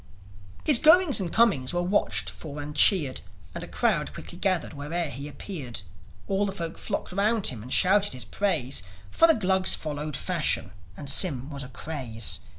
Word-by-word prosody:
His 290 -6 +8
goings 325 -3 +5
and 180 -4 -3
comings 195 - +2
were 175 - +1
watched 105 - 0
for 140 - -8
and 145 0 -7
cheered; 150 -5 +3 0.3
And - - -6
a - - -8
crowd - - 0
quickly 175 - -9
gathered 185 -6 -1
where'er 155 +3 -3
he 140 +3 -7
appeared. 140 - -7 0.5
All 200 +1 0
the - - -3
folk 170 -4 -6
flocked 200 -3 -4
around 210 +2 +1
him 115 -4 -7
and 125 +4 -10
shouted 195 0 +3
his 125 - -7
praise; 155 - -1 0.3
For 330 - +5
the 325 - +6
Glugs 190 -2 +2
followed 150 -1 -5
fashion, 160 - 0 0.3
and 140 - -8
Sym 140 -2 +3
was 140 -1 -5
a 125 - -9
craze. 120 - -2
160 Hz, 175 wpm, -26 LUFS, 135-195 Hz, 0.5 s, His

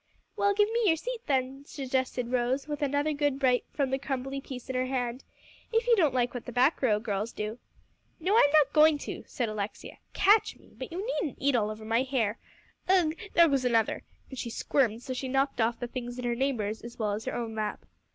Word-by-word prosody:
"Well, 405 0 +2
give 415 0 +4
me 465 - +1
your 325 - +5
seat 475 +8 -5
then," 270 0 0
suggested 260 -3 -2
Rose, 255 +3 0
with 295 -1 -4
another 285 +2 +1
good 290 -2 0
bite 250 -3 +2
from 275 -3 -1
the 265 - 0
crumbly 270 0 -3
piece 260 -3 -8
in 260 - -4
her 255 0 0
hand, 250 -1 -2 0.5
"if 455 0 +2
you 480 -1 +5
don't 310 - +2
like 245 -1 +1
what 245 - -6
the - - -4
back 255 +6 +3
row 215 -6 +3
girls 210 0 -2
do." 215 +3 -5 0.6
"No, 375 +6 +1
I'm 370 -11 +6
not 295 -2 +4
going 310 0 +6
to," - - -6
said 245 -4 -2
Alexia, 215 -1 -5
"catch 410 +3 +4
me! - - -21
but - - -7
you 370 +5 -4 0.2
needn't 295 - -4
eat 280 -1 +2
all 215 -3 +1
over 215 0 -7
my 225 +2 +2
hair. 250 -5 -1 0.5
Ugh! 355 -5 +4 0.2
there 340 0 +7
goes 275 -4 +1
another," 230 -3 +1 0.3
and 265 - -6
she 235 - -3
squirmed 235 -1 0
so 260 - -4
she 260 +1 -4
knocked 270 -1 +1
off 230 +1 +1
the 245 - -3
things 245 0 -6
in 250 - -4
her 240 - +1
neighbor's 235 -5 -1
as 235 0 -10
well 215 -2 0
as 210 +2 -4
her - - -3
own 230 -2 -3
lap. 215 -1 -3
260 Hz, 225 wpm, -29 LUFS, 235-290 Hz, 0.6 s, there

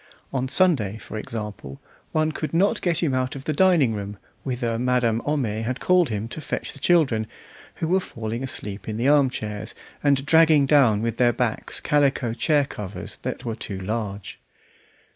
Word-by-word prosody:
On 130 -1 0
Sunday, 135 - +2
for 110 - -10
example, 105 -12 -6 0.3
one 155 0 +1
could 155 +1 -4
not 200 +5 +2
get 175 -2 +1
him 145 -5 +1
out 130 +1 -1
of 135 - -7
the 155 - -1
drawing 165 -8 +4
room, 100 -1 -5 0.2
whither 120 -3 -2
Madame 125 -2 +1
Homais 120 -8 0
had 125 +3 -3
called 180 -3 +3
him 105 0 -3
to 155 - -6
fetch - - -3
the 140 - -11
children, 135 -9 +2 0.5
who 160 - -3
were 185 +3 +3
falling 115 -8 -5
asleep 105 -6 -3
in 110 - -3
the 120 +3 +1
arm 140 -2 +5
chairs, 110 -2 -5 0.3
and 140 -2 +2
dragging 160 -1 +5
down 125 -7 +4
with 115 -1 -2
their 120 -1 +4
backs - - -2
calico 140 -5 +1
chair 145 +4 +2
covers 105 -7 -7
that 125 - -5
were 115 - -2
too 100 -3 -6
large. 100 0 -4
125 Hz, 180 wpm, -24 LUFS, 110-150 Hz, 0.5 s, arm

